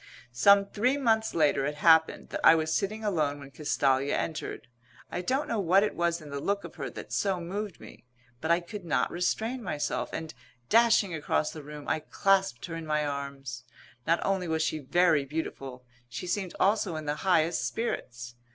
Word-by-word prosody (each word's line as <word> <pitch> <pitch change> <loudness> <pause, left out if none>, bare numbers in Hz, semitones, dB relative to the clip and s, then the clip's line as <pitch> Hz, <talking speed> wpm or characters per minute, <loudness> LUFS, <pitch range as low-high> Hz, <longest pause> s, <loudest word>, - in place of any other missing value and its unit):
Some 200 +11 +6
three 245 +7 0
months 220 -5 +1
later 150 -4 +3
it 150 - -3
happened 160 +1 +4
that - - -5
I - - +8
was 160 0 0
sitting 215 +2 -1
alone 155 -8 0
when 140 -1 -11
Castalia 140 -2 +1
entered. 155 -6 -4 0.4
I 175 - -2
don't 265 +10 -1
know 230 - -1
what 190 +1 +4
it 210 - -1
was 170 0 0
in 150 -2 -11
the 140 - -3
look 200 +6 -1
of - - -9
her - - -4
that - - -9
so 195 -3 0
moved 190 +2 -5
me; - - -13 0.4
but 160 - -4
I 170 +1 +4
could 200 +3 -8
not 165 -3 0
restrain 220 +8 -1
myself, 150 -8 -2
and, 160 -1 -5 0.4
dashing 220 -5 +4
across 155 -1 0
the 155 - -8
room, 150 0 -10
I - - +1
clasped 190 -4 +1
her 165 - -6
in 165 -1 -6
my 150 0 +1
arms. 140 -4 -5 0.4
Not 170 +1 +2
only 190 -2 0
was 160 -1 0
she 155 0 -1
very 160 +1 +3
beautiful; 135 -3 -6 0.2
she 150 - -6
seemed 185 0 -2
also 200 -3 +2
in 155 -1 -5
the 150 +1 -2
highest 165 -8 +2
spirits. 125 - -4
165 Hz, 190 wpm, -28 LUFS, 145-195 Hz, 0.4 s, I